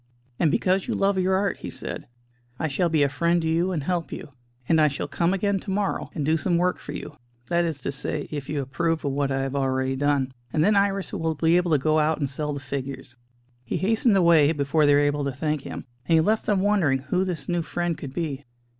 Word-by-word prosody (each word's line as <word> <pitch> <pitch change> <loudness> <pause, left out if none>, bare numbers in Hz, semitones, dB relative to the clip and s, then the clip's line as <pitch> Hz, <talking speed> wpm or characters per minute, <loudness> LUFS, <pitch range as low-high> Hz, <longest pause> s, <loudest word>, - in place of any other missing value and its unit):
"And 165 - +4
because 185 +5 +1
you - - -1
love 195 -1 +2
your 185 +1 +2
art," 200 +1 0
he - - -7
said, - - -5 0.5
"I 160 - -1
shall 170 +5 0
be 155 -3 +3
a - - +4
friend 170 +5 +1
to - - 0
you 170 +3 +1
and 160 -6 -2
help 175 +1 -2
you. - - -7 0.4
And 160 -1 +4
I 155 - +6
shall 140 -1 -3
come 170 0 0
again 195 +1 0
to 195 - -9
morrow 200 +1 -1
and 150 -4 -2
do 160 +2 +3
some 170 +1 +1
work 180 +1 +1
for - - -8
you 150 - -7 0.3
that 170 0 +2
is 160 -4 -3
to 135 - -2
say, 145 +1 -3
if 145 -3 -5
you 145 -2 -1
approve 165 +4 -1
of 140 - 0
what 140 0 0
I 135 0 0
have 135 0 -3
already 130 -1 0
done, 140 -1 +1 0.2
and 155 - +2
then 210 +3 +4
Iris 200 -1 +1
will 160 -1 -1
be 165 +3 +3
able 180 0 +2
to 155 - +4
go 155 +3 +2
out 155 +1 +2
and 140 - -1
sell 150 +2 -3
the 140 - -4
figures." 135 -2 -6 0.5
He 115 - -3
hastened 220 +1 +2
away 165 -5 +5
before 150 +1 +2
they 145 - +6
were - - +5
able 145 0 +1
to 140 - -1
thank 150 +2 -2
him, - - -7 0.2
and 165 - +4
he - - +6
left 215 +7 +1
them 200 -3 +2
wondering 190 -9 +2
who 140 +8 -1
this 170 -7 -4
new 175 -1 0
friend 175 +1 -2
could 140 -2 -7
be. 145 -5 -3
160 Hz, 250 wpm, -25 LUFS, 140-180 Hz, 0.5 s, I